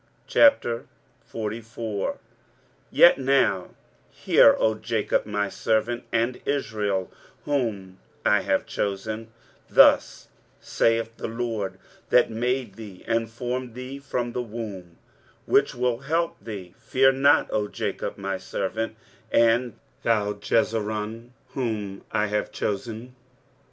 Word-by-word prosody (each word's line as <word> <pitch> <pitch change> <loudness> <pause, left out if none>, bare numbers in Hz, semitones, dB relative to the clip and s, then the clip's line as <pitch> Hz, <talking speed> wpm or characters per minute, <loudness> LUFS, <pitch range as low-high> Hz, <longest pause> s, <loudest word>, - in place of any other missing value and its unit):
23:044:001 115 - 0 0.7
Yet 175 - +6
now 130 -9 +2 0.4
hear, - - +5
O 110 - +2
Jacob 110 -1 -1
my 105 -1 -1
servant; 115 +4 -1
and 115 +2 0
Israel, 105 -9 -1 0.3
whom 105 -10 -2 0.3
I - - +4
have - - 0
chosen: 110 +3 -3 0.4
23:044:002 - - -22
Thus - - +5 0.3
saith 115 0 0
the - - -4
LORD 110 -5 -3 0.3
that 125 - +4
made 125 -1 -1
thee, 105 -5 -10
and 115 0 0
formed 125 +1 -4
thee 130 +2 -7
from 125 -3 -3
the 125 - -2
womb, 105 -7 -7 0.5
which - - +3
will 125 -1 0
help 165 +5 -1
thee; 100 -5 -7
Fear 130 +3 +3
not, 140 +2 +4
O 105 -1 0
Jacob, - - -4
my 95 -1 -3
servant; 110 +3 -3 0.4
and 115 0 +3 0.2
thou, 105 -3 +1
Jesurun, 110 +1 -1 0.2
whom 105 -7 -3
I 105 - +1
have 105 0 -2
chosen. 115 +4 -4
115 Hz, 115 wpm, -25 LUFS, 105-125 Hz, 0.7 s, Yet